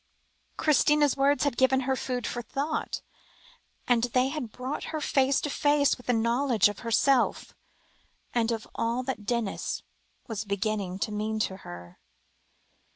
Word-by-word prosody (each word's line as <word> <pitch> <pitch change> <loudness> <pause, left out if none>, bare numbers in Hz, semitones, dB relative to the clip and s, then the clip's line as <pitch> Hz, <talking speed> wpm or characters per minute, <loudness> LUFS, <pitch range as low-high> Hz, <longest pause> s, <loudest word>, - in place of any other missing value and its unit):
Christina's 300 -1 +3
words 280 +1 +3
had 285 -4 0
given 265 0 +4
her 265 0 0
food 250 -2 -3
for 240 - -3
thought, 280 +7 -3 0.8
and 240 -2 +3
they 250 +2 +1
had 305 +2 -3
also 220 - -13
brought 255 +3 -4
her 315 - -3
face 270 -2 +2
to 295 - -2
face 290 -1 +3
with 250 - -17
the - - +3
knowledge 235 -1 +3
of 205 - -7
herself, 245 +3 +2 0.8
and 235 -1 +1
of 225 -1 -3
all 235 +2 -1
that 250 -5 -5
Denis 235 -5 -2 0.4
was 225 -4 -4
beginning 200 -2 -2
to 205 - -2
mean 215 +1 -2
to 190 -3 -2
her. 85 - -11
245 Hz, 155 wpm, -28 LUFS, 220-275 Hz, 0.8 s, given